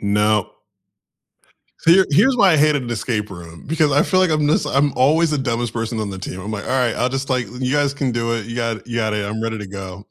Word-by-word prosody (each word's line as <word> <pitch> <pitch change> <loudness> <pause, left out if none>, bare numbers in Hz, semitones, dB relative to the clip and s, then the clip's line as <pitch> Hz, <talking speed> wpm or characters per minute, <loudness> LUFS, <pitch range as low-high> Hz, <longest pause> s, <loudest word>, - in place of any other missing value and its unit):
No. 105 0 0 1.2
So 165 - +2
here 190 +2 +6
here's 255 - +4
why 200 -6 +5
I - - +4
hated 150 -1 +3
an 120 - -6
escape 110 -2 -2
room, 85 -3 -11
because 155 -1 +1
I 145 +3 +4
feel 185 - +2
like 185 -2 +3
I'm 155 -1 +1
just 150 - +1
I'm 140 +1 +2
always 155 +5 +3
the 150 - 0
dumbest 120 -3 -2
person 115 0 -3
on 105 -2 -3
the 95 - -7
team. 95 -1 -7
I'm 100 +3 -6
like, 105 -2 -5
"Alright. 125 -3 0
I'll 125 - 0
just, 135 +1 -4
like 125 -3 0
you 130 0 -1
guys 145 -1 +2
can 135 -3 -1
do 115 0 -1
it. 110 -3 -4
You 115 - -7
got 115 -2 -3
you 120 -1 -5
got 110 -2 0
it. 105 -1 -2
I'm 110 +2 -4
ready 115 -1 -3
to 105 - -7
go." 95 +1 -9
120 Hz, 260 wpm, -20 LUFS, 105-145 Hz, 1.2 s, here